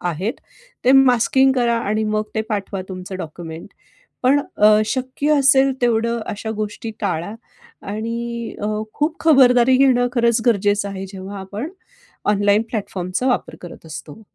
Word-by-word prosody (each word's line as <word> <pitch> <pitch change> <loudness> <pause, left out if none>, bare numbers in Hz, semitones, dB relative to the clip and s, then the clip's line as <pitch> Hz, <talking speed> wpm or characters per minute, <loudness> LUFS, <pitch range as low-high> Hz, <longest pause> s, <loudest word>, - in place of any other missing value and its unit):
आहेत. 180 +6 -2 0.5
ते 255 - +5
मास्किंग 265 0 +4
करा 240 -2 +1
आणि 215 0 -1
मग 215 0 -1
ते 220 - +1
पाठवा 200 -2 -3
तुमचं 185 0 -7
डॉक्युमेंट. 165 0 -8 0.6
पण 275 +3 +4 0.2
अ, 210 0 +6
शक्य 265 +5 0
असेल 270 0 +5
तेवढं 235 0 +1
अशा 220 +1 -4
गोष्टी 215 +2 -5
टाळा 185 -1 -2 0.6
आणि 235 +1 -4
अ, 210 - -1 0.3
खूप 310 +3 -1
खबरदारी 255 -4 +5
घेणं, 255 -2 +4
खरंच 235 -1 +2
गरजेचं 205 -2 +2
आहे. 195 -1 -6
जेव्हा 195 +1 -8
आपण 205 +9 -6 0.6
ऑनलाईन 205 +1 +3
प्लॅटफॉर्मचा 195 +1 -3
वापर 250 - -1
करत 175 -2 -11
असतो. 155 +5 -9
220 Hz, 140 wpm, -20 LUFS, 200-250 Hz, 0.6 s, अ